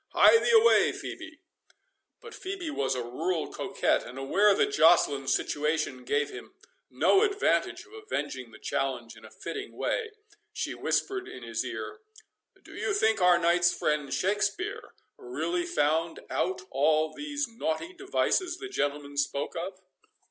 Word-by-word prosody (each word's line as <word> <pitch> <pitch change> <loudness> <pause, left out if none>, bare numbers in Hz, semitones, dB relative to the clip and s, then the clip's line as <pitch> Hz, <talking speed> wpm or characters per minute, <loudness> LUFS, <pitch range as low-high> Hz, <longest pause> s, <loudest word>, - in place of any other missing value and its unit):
—Hie 455 - +7
thee - - 0
away, 465 0 +6
Phœbe." 320 -1 -8 0.8
But 455 -2 -11
Phœbe 380 -5 -5
was 135 - -1
a 125 - -2
rural 160 +8 -2
coquette, 195 0 0
and, 125 - -10
aware 195 +10 +3
that - - +2
Joceline's 145 -4 +4
situation 150 -4 -1
gave 145 +2 0
him - - -10 0.3
no 390 - +4
advantage 415 +1 +1
of 405 - -20
avenging 425 - -4
the 110 - -14
challenge 120 -3 -3
in 110 - -16
a - - -11
fitting 405 - -7
way, 445 - -1 0.4
she - - -3
whispered 390 -1 -1
in - - -9
his - - -2
ear, 430 - -6 0.6
"Do - - -14
you 405 - -1
think 220 - +2
our 180 -1 +6
knight's 175 +1 +3
friend, 150 -2 -1
Shakspeare, 210 - -1 0.2
really 365 -3 -2
found 165 - 0
out 185 +1 -1
all 155 +3 +2
these 290 - -3
naughty 230 - -3
devices 370 -1 0
the 395 +1 -7
gentleman 145 - -2
spoke 140 0 -1
of?" 185 +2 -5
180 Hz, 150 wpm, -28 LUFS, -, 0.8 s, Hie